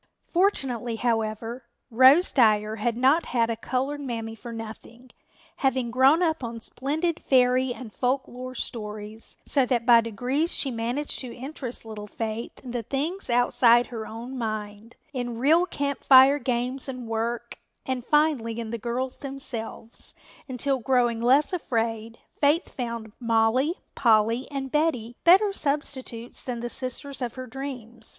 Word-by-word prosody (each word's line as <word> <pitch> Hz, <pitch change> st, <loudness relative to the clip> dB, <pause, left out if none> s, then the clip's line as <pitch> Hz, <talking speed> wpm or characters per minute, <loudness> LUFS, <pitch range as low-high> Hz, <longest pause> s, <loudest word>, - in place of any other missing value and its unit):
Fortunately, 265 Hz, -, 0 dB
however, 225 Hz, +1 st, -2 dB, 0.3 s
Rose 260 Hz, +9 st, +6 dB
Dyer 215 Hz, -3 st, +3 dB
had 230 Hz, +2 st, -1 dB
not 270 Hz, +7 st, +4 dB
had 230 Hz, 0 st, +3 dB
a -, -, -1 dB
colored 265 Hz, +5 st, -2 dB
Mammy 230 Hz, -4 st, -4 dB
for 235 Hz, +1 st, -9 dB
nothing, 230 Hz, +2 st, -9 dB, 0.5 s
having 260 Hz, -3 st, 0 dB
grown 270 Hz, +7 st, +5 dB
up 320 Hz, -5 st, 0 dB
on 230 Hz, -1 st, -5 dB
splendid 310 Hz, +8 st, -2 dB
fairy 255 Hz, 0 st, +3 dB
and 240 Hz, -3 st, -8 dB
folk 260 Hz, +2 st, 0 dB
lore 255 Hz, +1 st, -8 dB
stories, 215 Hz, -1 st, -6 dB
so 275 Hz, -, +3 dB
that 240 Hz, -3 st, 0 dB
by 235 Hz, -2 st, +7 dB
degrees 250 Hz, -, -1 dB
she 270 Hz, -, +1 dB
managed 240 Hz, +5 st, -2 dB
to 250 Hz, -3 st, -5 dB
interest 260 Hz, -2 st, -6 dB
little 210 Hz, -2 st, -7 dB
Faith 220 Hz, +2 st, -5 dB
in 250 Hz, -, -7 dB
the 240 Hz, -1 st, -2 dB
things 295 Hz, -, -3 dB
outside 240 Hz, 0 st, +4 dB
her 220 Hz, -2 st, -5 dB
own 235 Hz, +4 st, -7 dB
mind, 215 Hz, -1 st, -5 dB, 0.2 s
in 245 Hz, -3 st, -3 dB
real 320 Hz, +8 st, +4 dB
Camp 280 Hz, -4 st, -3 dB
Fire 270 Hz, +2 st, +7 dB
games 250 Hz, +1 st, -1 dB
and 250 Hz, -3 st, -6 dB
work, 230 Hz, +1 st, -3 dB, 0.3 s
and 260 Hz, -2 st, -2 dB
finally 285 Hz, -6 st, +1 dB
in 225 Hz, -1 st, -5 dB
the 235 Hz, -, -3 dB
girls 250 Hz, +3 st, -3 dB
themselves, 265 Hz, -5 st, -6 dB, 0.3 s
until, 260 Hz, +1 st, 0 dB
growing 240 Hz, -2 st, +1 dB
less 270 Hz, +8 st, +4 dB
afraid, 230 Hz, -7 st, -2 dB
Faith 295 Hz, +4 st, +1 dB
found 230 Hz, -3 st, -5 dB
Mollie, 235 Hz, +6 st, +2 dB, 0.2 s
Polly 230 Hz, +1 st, +3 dB
and 270 Hz, -2 st, -4 dB
Betty 255 Hz, -7 st, 0 dB
better 390 Hz, +4 st, +6 dB
substitutes 270 Hz, -7 st, -3 dB
than 245 Hz, -2 st, -4 dB
the 240 Hz, +1 st, -4 dB
sisters 270 Hz, +2 st, -3 dB
of 245 Hz, -2 st, -3 dB
her 255 Hz, 0 st, -6 dB
dreams. 245 Hz, -3 st, -5 dB
245 Hz, 150 wpm, -26 LUFS, 230-270 Hz, 0.5 s, by